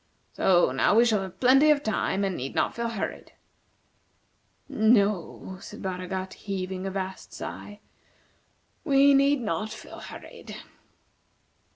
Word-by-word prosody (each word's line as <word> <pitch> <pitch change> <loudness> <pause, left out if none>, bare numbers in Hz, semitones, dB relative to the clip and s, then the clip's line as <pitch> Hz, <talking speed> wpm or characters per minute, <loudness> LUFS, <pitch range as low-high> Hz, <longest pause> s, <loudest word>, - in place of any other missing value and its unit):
So 175 -7 +3
now 135 +9 +2
we 235 +2 +6
shall 215 -4 +2
have 190 -2 -8
plenty 270 +4 +5
of 295 -1 +3
time, 205 -2 0
and 190 -2 -2
need 135 -1 -5
not - - +1
feel 235 0 -2
hurried." 225 -4 -5 1.3
"No," 205 -4 +1
said - - -10
Baragat, 185 0 -4
heaving 190 -1 -4
a - - -1
vast 190 0 -6
sigh, 205 0 -8 1.0
"we 280 -2 +5
need 275 0 +3
not 210 0 -2
feel - - -10
hurried." - - -10
200 Hz, 130 wpm, -26 LUFS, 185-240 Hz, 1.3 s, we